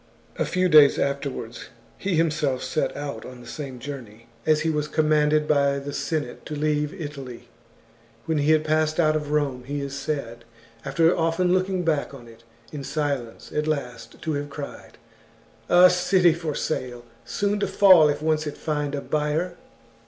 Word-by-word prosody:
A - - +2
few 185 0 +1
days 150 -4 +7
afterwards 140 -4 -3 0.3
he 195 -2 -2
himself 155 -5 0
set 130 +4 -2
out 145 -1 -5
on 125 -1 -10
the 120 - -13
same 130 +1 -7
journey, 120 -4 -9 0.2
as 155 -1 +4
he 160 - 0
was 150 -1 -1
commanded 150 -1 +2
by 140 -1 +2
the 140 +1 -6
Senate 155 0 -3
to 150 - -5
leave 150 0 0
Italy. 135 -6 -8 0.8
When 160 -2 0
he 145 +1 +1
had 155 0 +2
passed 155 +1 +1
out 155 -2 +3
of 150 -1 -2
Rome, 145 -4 0
he 145 +2 -3
is 140 -1 -5
said, 135 -5 -4 0.4
after 165 0 +2
often 165 +2 +1
looking 185 -1 0
back 150 -3 0
on 120 -3 -13
it 115 0 -16 0.3
in 145 -2 -6
silence, 140 -7 -3
at 150 0 -1
last 125 -7 -4
to 160 - -1
have 145 0 -3
cried: 140 0 -9 0.4
" 115 0 -31
A 180 +1 +8
city 180 -1 +3
for 160 -3 -4
sale, 125 -5 -3 0.2
soon 205 0 -1
to - - 0
fall 185 -7 +6
if 145 +1 -2
once 155 -1 +1
it 145 - -6
find 150 -2 -2
a 140 - -3
buyer." 155 +5 -1
150 Hz, 175 wpm, -24 LUFS, 140-155 Hz, 0.8 s, A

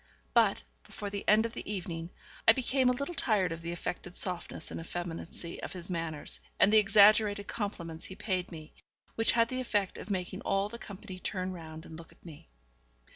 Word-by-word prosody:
But, - - +4 0.2
before 205 -1 -6
the 200 0 -3
end 215 +2 +6
of 230 - -4
the - - -5
evening, 170 -4 -4 0.4
I 225 - +10
became 260 +1 +2
a - - +5
little 280 +7 -3
tired 215 - +2
of 165 0 -5
the 170 0 -4
affected 175 +1 -5
softness 180 -2 -3
and - - -4
effeminacy 170 0 -6
of - - -5
his 180 0 -4
manners, 165 -3 -2 0.2
and 205 - +6
the 220 - +9
exaggerated 205 0 +6
compliments 170 -7 -4
he 190 - -6
paid 190 -3 -2
me, 155 -2 -9 0.4
which 225 - +4
had 230 0 +4
the 255 0 -2
effect 205 -6 0
of - - -9
making 185 0 -2
all 195 +1 +1
the 235 +2 -8
company 190 -3 -8
turn 185 -1 -2
round 160 -2 -9
and 160 0 -9
look 165 - -12
at - - -23
me. 150 - -12
190 Hz, 195 wpm, -31 LUFS, 170-215 Hz, 0.4 s, I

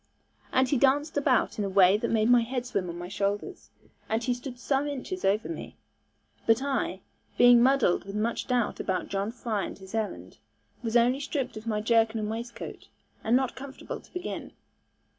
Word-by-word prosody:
And 260 0 +3
he 275 - +1
danced 285 +3 +2
about 280 -6 +2
in - - +1
a 200 - -1
way 190 0 +6
that 210 - -1
made 220 -1 +2
my 245 0 +6
head 245 +1 -3
swim 200 -7 -2
on 170 - -6
my 175 0 -6
shoulders, 200 - -3 0.4
and 225 +2 0
he 250 - +1
stood 245 +1 -7
some 270 +3 0
inches 290 +7 -5
over 205 +3 +2
me. 335 - -7 0.7
But 225 +3 +4
I, 260 -9 -1 0.4
being 245 -1 +7
muddled 260 -9 +3
with 195 +1 -7
much 225 +2 -1
doubt 245 -3 0
about 185 -2 -2
John 200 +2 -1
Fry 230 -4 -2
and - - -7
his 190 0 -13
errand, 220 -2 -4 0.4
was 230 0 +2
only 245 +3 +3
stripped 285 -2 -3
of 215 +1 -8
my 210 -2 0
jerkin 225 0 +2
and 215 0 -2
waistcoat, 235 +1 -7 0.4
and 225 +2 +3
not 260 -1 +1
comfortable 270 +1 -7
to - - -22
begin. 360 +1 -5
235 Hz, 190 wpm, -28 LUFS, 210-265 Hz, 0.7 s, being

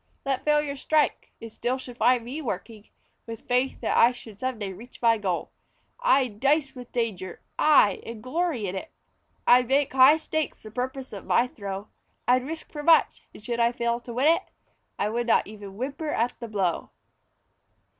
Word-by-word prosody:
Let 270 -1 -1
failure 295 -1 +1
strike 300 +2 0
it 225 -1 -9
still 245 +4 -2
should 255 -2 -9
find 245 -2 +3
me 275 +6 -5
working 215 -3 -6 0.4
With 225 -1 -8
faith 250 +2 0
that - - 0
I 235 +2 +6
should 220 -4 -12
some 255 -2 -2
day 200 -3 -4
reach 235 +7 -13
my 230 -2 +3
goal. 185 -4 -2 0.5
I'd 265 - +2
dice 280 +1 +2
with 250 -1 -11
danger 205 -7 -3 0.2
aye! 295 -9 +5
and 225 -2 -8
glory 295 -4 -1
in 185 0 -3
it; 255 - -5 0.6
I'd 250 0 +6
make 275 +1 +2
high 265 +4 +7
stakes 315 -1 -3
the 215 - -10
purpose 260 +2 -4
of 200 - -8
my 235 - +4
throw. 200 -4 -7 0.4
I'd 255 +1 +3
risk 320 +1 -6
for 295 - -6
much, 325 +2 +3
and - - -14
should 235 +2 -3
I 235 0 +4
fail 235 0 -1
to 240 0 -10
win 265 +4 +3
it, 330 +1 +4 0.6
I 205 - 0
would 235 +2 -2
not - - +4
even 205 -2 -10
whimper 280 +5 -4
at 240 -3 0
the 235 - -6
blow. 195 -6 -1
245 Hz, 185 wpm, -26 LUFS, 220-275 Hz, 0.6 s, high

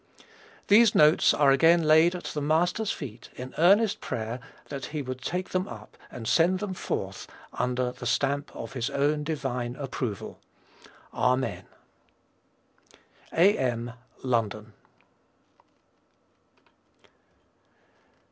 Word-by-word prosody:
These 215 +1 +6
"Notes" 150 +1 +5
are 145 -2 +4
again 165 +5 +5
laid 160 +3 +5
at 180 - -7
the 150 - -4
Master's 175 +8 +1
feet 120 -5 -8
in 130 +1 -8
earnest 200 +5 +4
prayer 115 +2 -4 0.3
that 140 -2 -5
he 150 -2 -4
would 130 0 -6
take 180 +7 -3
them 185 0 -1
up 110 -3 -11
and 115 -3 -8
send 175 +7 +3
them 195 0 -4
forth - - -4 0.3
under 125 0 -1
the 125 0 -7
stamp 140 +4 0
of - - -7
his 125 -3 -2
own 150 +2 0
divine 125 -6 -3
approval. 125 -7 -5 0.7
Amen. 130 +1 0 1.7
A.M. 125 - +2 0.3
_London. 110 -3 -1
140 Hz, 110 wpm, -27 LUFS, 125-170 Hz, 1.7 s, These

